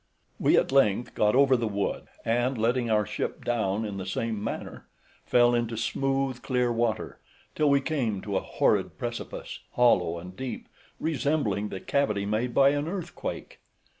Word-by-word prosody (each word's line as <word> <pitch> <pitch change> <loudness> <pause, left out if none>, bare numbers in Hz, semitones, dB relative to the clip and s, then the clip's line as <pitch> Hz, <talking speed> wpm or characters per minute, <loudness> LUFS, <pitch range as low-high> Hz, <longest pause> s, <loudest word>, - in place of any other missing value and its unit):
We - - +4
at - - +2
length 120 -3 +3
got 105 +1 +2
over 135 -1 +5
the 115 -2 0
wood, 100 -1 -2 0.2
and, 120 +3 +1
letting 120 +2 +1
our 105 -1 +3
ship - - -4
down 110 -3 0
in 100 -2 -5
the 95 - -5
same 110 +2 -2
manner, - - -5 0.4
fell 120 0 +5
into 120 -1 0
smooth 135 +1 -1
clear 125 -2 +1
water, 115 -2 -1 0.3
till 150 -1 +2
we 140 0 +4
came 130 -10 -1
to 100 -2 -3
a - - +3
horrid - - +1
precipice, - - -5
hollow 90 -9 +3
and 90 +2 -9
deep, 125 +2 -6 0.3
resembling 140 -9 0
the 95 - -5
cavity 105 -8 0
made 110 +4 -1
by 135 +2 +5
an 145 +1 -1
earthquake. 175 -3 -5
120 Hz, 165 wpm, -27 LUFS, 105-135 Hz, 0.4 s, over